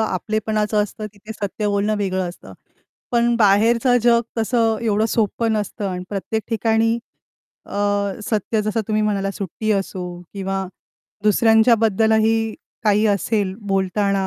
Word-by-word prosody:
आपलेपणाचं 215 +1 0
असतं 210 +1 -6
तिथे 210 +2 -10
सत्य 210 0 -3
बोलणं 205 +1 +1
वेगळं 190 -2 -1
असतं. 175 - -11 0.6
पण 235 0 +3
बाहेरचं 230 +4 +4
जग 235 -1 +5 0.2
तसं 225 -1 +1
एवढं 215 -1 +2
सोपं 225 +1 0
नसतं 210 -1 -2
अन् 180 0 -4
प्रत्येक 210 +2 -3
ठिकाणी 225 0 +2 0.7
अ, - - -12 0.5
सत्य 215 0 0
जसं 215 +2 -1
तुम्ही 215 0 +1
म्हणालात 200 -2 0
सुट्टी 210 +2 -4
असो 195 -2 -2 0.3
किंवा 195 -1 -2 0.6
दुसऱ्यांच्या 220 +2 +5
बद्दलही 220 0 +2 0.3
काही 210 +1 +3
असेल 200 -1 0
बोलताना 195 0 +1
215 Hz, 125 wpm, -21 LUFS, 200-225 Hz, 0.7 s, जग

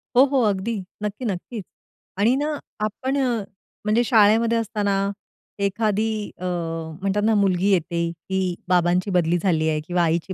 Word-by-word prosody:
हो, 255 - +8
हो. 275 -2 +1
अगदी. 210 +2 0 0.3
नक्की, 210 +5 -3
नक्कीच. 205 +2 -4 0.5
आणि 225 +6 +3
ना 295 +1 -1 0.3
आपण 260 +6 -2 0.7
म्हणजे 220 +3 +3
शाळेमध्ये 225 0 +4
असताना 210 -3 -1 0.7
एखादी 215 +2 0 0.3
अ, 185 - -5
म्हणतात 170 +3 -2
ना, 225 - +4
मुलगी 195 -1 +2
येते 170 -1 +1
की 185 +2 -2
बाबांची 180 +2 +2
बदली 175 0 +2
झाली 160 -3 +1
आहे 155 - 0
किंवा 175 -1 +1
आईची 170 +3 0
195 Hz, 140 wpm, -23 LUFS, 175-225 Hz, 0.7 s, हो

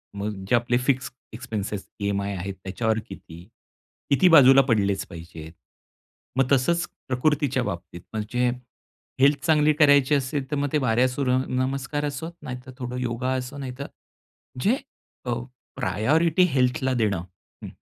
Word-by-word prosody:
मग 100 -1 -4
जे 120 - +5
आपले 120 +1 +2
फिक्स 130 +1 0 0.2
एक्सपेन्सेस, 110 -4 -5
ईएमआय 100 0 -1
आहेत, 95 +3 -4
त्याच्यावर 110 +3 -1
किती? 85 +1 -11 0.7
किती 140 +6 +4
बाजूला 135 -4 +8
पडलेच 100 -3 +1
पाहिजेत? 80 -1 -10 0.8
मग 135 - +4
तसंच, 170 +6 +2 0.2
प्रकृतीच्या 135 0 +1
बाबतीत 85 -4 -6
म्हणजे. 120 +3 0 0.7
हेल्थ 140 0 +4
चांगली 155 -1 +4
करायची 145 -1 +5
असेल 135 0 -2
तर 150 - +1
मग 145 0 0
ते - - +4
बारा 125 -1 +2
सुर्य 130 -1 0
नमस्कार 135 +3 -2
असो, 145 +3 -4
नाहीतरं 125 -1 -7
थोडं 125 -1 -5
योगा 125 +1 -2
असो, 130 +2 -6
नाहीतर 135 0 -6 0.7
जे, 220 +5 +3 0.5
अ, 120 - 0 0.4
प्रायोरिटी 155 - +2
हेल्थला 130 0 +1
देणं. 105 -7 0 0.4
हं, - - -5
125 Hz, 135 wpm, -24 LUFS, 105-140 Hz, 0.8 s, बाजूला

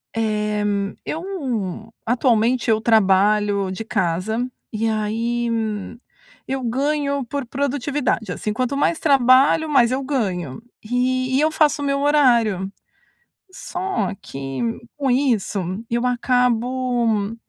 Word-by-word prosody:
Eh, 210 -1 0 0.4
eu, 255 - -4
atualmente 240 0 +2
eu 220 -1 +4
trabalho 205 -2 +3
de 190 - -5
casa, 215 +2 -1 0.2
e 225 +1 -1
aí, 230 +2 -1 1.0
eu 265 0 -2
ganho 280 +2 0
por 280 +3 -4
produtividade, 275 -4 -1
assim, 210 +3 -3
quanto 255 +3 -1
mais 320 +3 +1
trabalho 275 +2 +4
mais 245 -5 +4
eu 270 +1 -1
ganho. 190 - -2 0.2
E 255 +2 0
e - - +3
eu 310 +1 +2
faço 305 -2 +2
o 285 - -2
meu 275 0 0
horário. 235 -10 +3 0.8
Só 375 - -3
que 135 0 -6 0.4
com 275 -3 0
isso, 245 -6 +1 0.3
eu 235 +1 0
acabo 245 -3 +1
240 Hz, 115 wpm, -21 LUFS, 215-275 Hz, 1.0 s, eu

